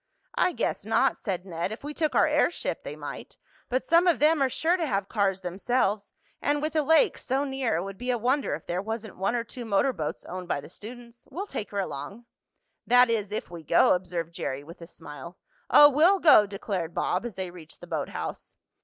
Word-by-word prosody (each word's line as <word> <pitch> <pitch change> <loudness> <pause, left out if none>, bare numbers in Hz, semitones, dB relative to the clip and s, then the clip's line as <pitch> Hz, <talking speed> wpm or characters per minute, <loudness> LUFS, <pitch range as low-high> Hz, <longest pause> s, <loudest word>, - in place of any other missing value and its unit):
"I 365 - +2
guess - - -2
not," - - +2
said 190 -3 -4
Ned. 170 +1 -3
"If 220 - -8
we 295 +1 -5
took 310 -1 -1
our - - +5
airship 300 +3 0
they - - -6
might. - - -8 0.3
But 255 +1 -1
some 335 +2 +4
of 340 -6 +4
them 305 +2 +3
are 270 - +3
sure 325 +7 +1
to 335 -4 -1
have 195 -5 -1
cars 195 -3 0
themselves, 200 +3 -1 0.3
and 290 0 +1
with 305 +1 -2
the 310 - +2
lake 320 - +3
so 270 +2 -1
near 265 -4 -1
it 170 - -1
would 195 0 -8
be 250 - -4
a 245 - +2
wonder 260 +5 0
if - - -11
there 175 +2 -2
wasn't 220 0 -5
one 195 +6 0
or 235 - 0
two 240 +1 -9
motor 225 +4 +1
boats 155 -7 -5
owned 180 0 -7
by 155 - -1
the 145 - -11
students. 235 +5 -12
We'll 350 +9 -5
take 215 - -5
her 200 - -3
along." 195 +6 -5 0.6
"That 245 0 +6
is, 210 -3 -1
if 210 - -4
we 170 -1 -8
go," 160 +2 +4
observed 175 -2 -3
Jerry 140 -4 -4
with 170 +4 -13
a 170 - -9
smile. 160 +1 -11 0.3
"Oh, 290 - +9
we'll 315 +8 +4
go!" 295 - +6
declared 195 -4 -4
Bob, 180 - 0
as 240 -5 -6
they 185 -2 -5
reached 165 -3 -13
the - - -10
boathouse. 140 - -5
215 Hz, 220 wpm, -27 LUFS, 180-270 Hz, 0.6 s, Oh